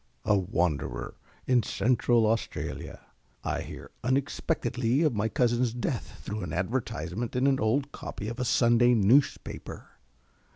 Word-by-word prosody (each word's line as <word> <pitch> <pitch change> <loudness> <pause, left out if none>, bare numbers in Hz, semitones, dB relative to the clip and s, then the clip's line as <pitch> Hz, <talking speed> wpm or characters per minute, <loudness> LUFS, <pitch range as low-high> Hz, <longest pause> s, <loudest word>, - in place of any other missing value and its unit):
A 105 -1 +4
wanderer 90 -5 -1 0.3
in 125 -2 +4
Central 120 +1 +2
Australia, 115 +1 -2 0.4
I - - -1
hear - - -9
unexpectedly 130 -1 0
of 150 -5 +3
my 110 +1 0
cousin's 120 0 +1
death 120 0 -4
through 105 +1 -4
an 90 -4 -5
advertisement 95 +1 -2
in 125 +1 +2
an 135 -1 +3
old 135 +6 +1
copy 105 - -6
of 115 +3 -5
a - - 0
Sunday 120 0 +4
newspaper. 115 +7 +1
120 Hz, 130 wpm, -28 LUFS, 105-130 Hz, 0.4 s, A